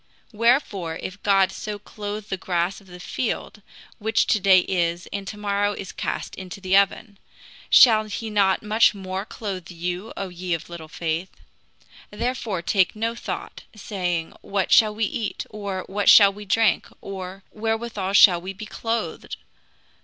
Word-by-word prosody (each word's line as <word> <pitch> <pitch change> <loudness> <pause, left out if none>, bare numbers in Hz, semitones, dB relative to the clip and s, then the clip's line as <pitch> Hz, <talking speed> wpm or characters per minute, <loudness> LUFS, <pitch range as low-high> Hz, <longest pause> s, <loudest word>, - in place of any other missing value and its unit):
Wherefore, 210 - +1
if 185 +4 -7
God 195 -2 +3
so 210 +1 -5
clothe 210 0 -7
the - - -1
grass 180 +1 -2
of 195 - -21
the 180 0 -11
field, 215 +2 -4 0.4
which 220 +1 +1
to 210 - +2
day 190 -1 +6
is, 175 -1 -1
and 200 -1 -4
to 210 - -6
morrow 205 0 0
is 195 -2 -7
cast - - -4
into 190 0 -8
the 190 0 +1
oven, 200 +1 +1 0.5
shall 220 -3 +7
he 215 +1 -5
not 195 -2 +2
much 215 +1 +4
more 190 0 -5
clothe 195 -6 -6
you, 180 +4 -4
O 195 - -3
ye 180 -1 -2
of 165 +1 -9
little 165 -2 -8
faith? 165 +3 -3 0.8
Therefore 220 -5 -3
take 190 +2 +2
no 225 +2 -1
thought, 235 - -6
saying, 180 -6 -3
What 195 -2 -2
shall 215 -1 +5
we 220 0 +1
eat? 215 +1 -3
or, 200 -3 -4
What 200 +1 +1
shall 200 -2 +8
we 210 +1 -10
drink? 220 +2 +2
or, 190 0 -7
Wherewithal 220 -3 -2
shall 180 -4 +7
we 190 +2 -6
be 215 +3 -8
clothed? 225 +2 -4
200 Hz, 160 wpm, -23 LUFS, 185-215 Hz, 0.8 s, shall